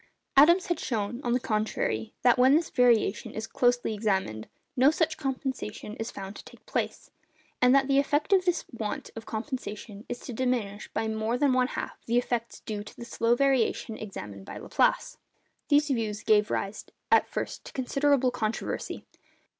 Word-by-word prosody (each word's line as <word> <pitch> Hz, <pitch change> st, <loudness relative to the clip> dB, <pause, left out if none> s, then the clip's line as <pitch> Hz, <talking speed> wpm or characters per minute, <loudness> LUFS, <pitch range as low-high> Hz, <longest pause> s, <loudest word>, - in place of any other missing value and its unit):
Adams 340 Hz, +7 st, +7 dB
has 345 Hz, -2 st, -1 dB
shown, 230 Hz, 0 st, -2 dB
on 240 Hz, -, +1 dB
the 250 Hz, -, +2 dB
contrary, 215 Hz, -, -1 dB
that 250 Hz, 0 st, +5 dB
when 260 Hz, +3 st, +6 dB
this 325 Hz, +1 st, +1 dB
variation 235 Hz, -4 st, +2 dB
is 220 Hz, -, -3 dB
closely 245 Hz, -1 st, +1 dB
examined, 190 Hz, -, -1 dB, 0.3 s
no 265 Hz, +2 st, +6 dB
such 315 Hz, 0 st, +1 dB
compensation 260 Hz, -7 st, -4 dB
is 225 Hz, +1 st, -4 dB
found 195 Hz, +1 st, -7 dB
to -, -, -10 dB
take -, -, -16 dB
place; -, -, -3 dB, 0.5 s
and 250 Hz, +1 st, +6 dB
that 270 Hz, -1 st, +4 dB
the 275 Hz, 0 st, +4 dB
effect 290 Hz, +6 st, +1 dB
of 380 Hz, -1 st, +5 dB
this 355 Hz, -2 st, 0 dB
want 220 Hz, -4 st, -4 dB
of 225 Hz, 0 st, -8 dB
compensation 215 Hz, -3 st, -5 dB
is 245 Hz, -, -3 dB
to 245 Hz, -, -8 dB
diminish 230 Hz, -5 st, -1 dB
by 220 Hz, -, -1 dB
more 220 Hz, +2 st, -1 dB
than 275 Hz, -1 st, +3 dB
one 255 Hz, 0 st, +3 dB
half -, -, -6 dB
the 235 Hz, +1 st, +2 dB
effects 240 Hz, -1 st, -2 dB
due 210 Hz, -2 st, -5 dB
to 210 Hz, -, -12 dB
the 235 Hz, -, -8 dB
slow 235 Hz, 0 st, +1 dB
variation 255 Hz, -4 st, +1 dB
examined 105 Hz, -, -8 dB
by -, -, -8 dB
Laplace. -, -, +1 dB, 0.5 s
These 295 Hz, +1 st, +4 dB
views 220 Hz, -4 st, -2 dB
gave 210 Hz, 0 st, +4 dB
rise 200 Hz, +2 st, -2 dB, 0.3 s
at -, -, +5 dB
first -, -, -4 dB
to -, -, -9 dB
considerable 275 Hz, 0 st, +2 dB
controversy. 225 Hz, -2 st, -3 dB
240 Hz, 175 wpm, -28 LUFS, 215-270 Hz, 0.5 s, Adams